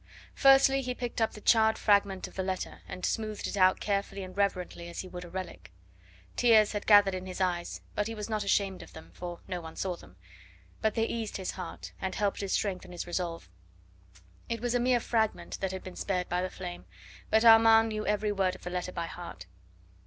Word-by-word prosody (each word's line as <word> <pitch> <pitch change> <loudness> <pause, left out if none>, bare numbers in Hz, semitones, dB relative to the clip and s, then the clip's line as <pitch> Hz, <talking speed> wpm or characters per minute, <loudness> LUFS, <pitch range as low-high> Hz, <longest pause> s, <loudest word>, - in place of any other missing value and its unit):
Firstly, 270 0 +6
he 250 -1 -3
picked 240 -1 -4
up 225 - +1
the 210 - -10
charred 220 0 +4
fragment 200 -2 +2
of - - -15
the 190 - -3
letter, 185 0 -4
and 185 - -5
smoothed 215 -1 -2
it - - -3
out 185 -1 +4
carefully 200 -1 -2
and 185 0 -9
reverently 180 -3 -1
as 170 - -5
he 185 - -9
would 180 -1 -8
a 175 - -10
relic. 170 - -7 0.6
Tears 220 -3 +5
had 205 -1 -4
gathered 205 -2 +7
in 185 0 -5
his 185 - -6
eyes, 175 -2 -1
but 210 - -1
he 225 - -5
was 210 -1 -5
not 215 -2 -1
ashamed 195 -1 +1
of - - -13
them, 160 - -12
for 175 -1 -7
no 180 -2 -4
one 160 -1 -9
saw 185 -2 -2
them; - - -16 0.7
but 220 - +1
they 225 -1 +2
eased 225 -2 -3
his 190 -2 -3
heart, 185 - -8
and 190 - -2
helped 205 -1 0
to 200 - -3
strengthen 185 -2 -1
his 175 - -5
resolve. 175 - -3 1.0
It 230 - -2
was 240 +1 -1
a 245 - +2
mere 245 0 +3
fragment 220 -2 -1
that 190 -1 -2
had 190 0 -6
been 185 - -9
spared 180 -2 -2
by 180 +1 0
the 185 - -2
flame, 90 - -7 0.4
but 220 +1 +3
Armand 225 0 +7
knew 215 -1 -3
every 210 0 +1
word 190 -2 0
of - - -15
the 175 - -5
letter 180 0 -3
by 170 -2 -3
heart. 165 - -8
195 Hz, 220 wpm, -30 LUFS, 180-220 Hz, 1.0 s, gathered